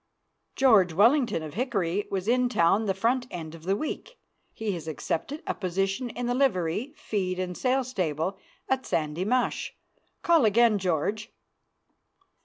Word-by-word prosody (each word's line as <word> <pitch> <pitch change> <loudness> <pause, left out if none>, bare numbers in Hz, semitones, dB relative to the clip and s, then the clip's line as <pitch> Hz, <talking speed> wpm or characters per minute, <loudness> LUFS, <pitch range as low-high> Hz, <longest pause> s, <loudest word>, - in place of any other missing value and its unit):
George 210 -10 +5
Wellington, 230 - +3
of 155 -2 -7
Hickory, 205 -5 -1
was 190 0 -3
in 250 +1 +3
town 195 0 +3
the 195 - +1
front 245 +5 +1
end 160 -3 -7
of 165 0 -12
the 195 +2 +2
week. 405 - -5 0.3
He 220 -2 -3
has 165 -4 -6
accepted 165 - -3
a - - -1
position 195 +5 -2
in 245 +1 -4
the 245 - 0
livery, 245 - 0
feed 185 -4 -2
and 180 -1 -3
sale 260 +4 +1
stable 185 - -2 0.3
at 265 0 0
Sandy 155 +3 -1
Mush. 250 +4 0 0.5
Call 335 -4 +4
again, 220 0 +4
George. 190 +4 -1
205 Hz, 150 wpm, -27 LUFS, 180-250 Hz, 0.5 s, George